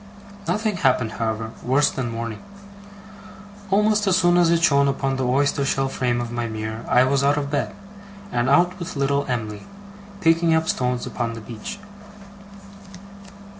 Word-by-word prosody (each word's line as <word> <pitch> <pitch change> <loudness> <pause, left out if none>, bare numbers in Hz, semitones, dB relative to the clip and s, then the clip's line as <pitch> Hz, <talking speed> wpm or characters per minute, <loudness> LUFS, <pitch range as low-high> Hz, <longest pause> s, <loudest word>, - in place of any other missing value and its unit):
Nothing 215 -2 0
happened, 125 -8 +2
however, 110 0 -3
worse 135 +4 +2
than 125 -3 -3
morning. 115 -1 -5 1.3
Almost 210 +1 +2
as 185 -1 +4
soon 175 -1 +3
as 175 -1 +4
it 170 0 +2
shone 140 -3 +4
upon 135 -1 -1
the 130 -1 -1
oyster 140 +2 +1
shell 135 0 0
frame 125 -2 -1
of 120 -1 -4
my 120 -1 -2
mirror 110 +1 -5
I 125 - +5
was 135 +1 +1
out 145 +1 +3
of 140 -1 -3
bed, 145 - -2 0.6
and 120 -5 0
out 175 +6 +3
with 175 - -6
little 140 0 0
Em'ly, 110 -5 -3 0.6
picking 165 -2 +3
up 160 0 0
stones 125 -1 -1
upon 115 -1 -3
the 115 - -8
beach. 110 - -7
135 Hz, 160 wpm, -22 LUFS, 120-165 Hz, 1.3 s, I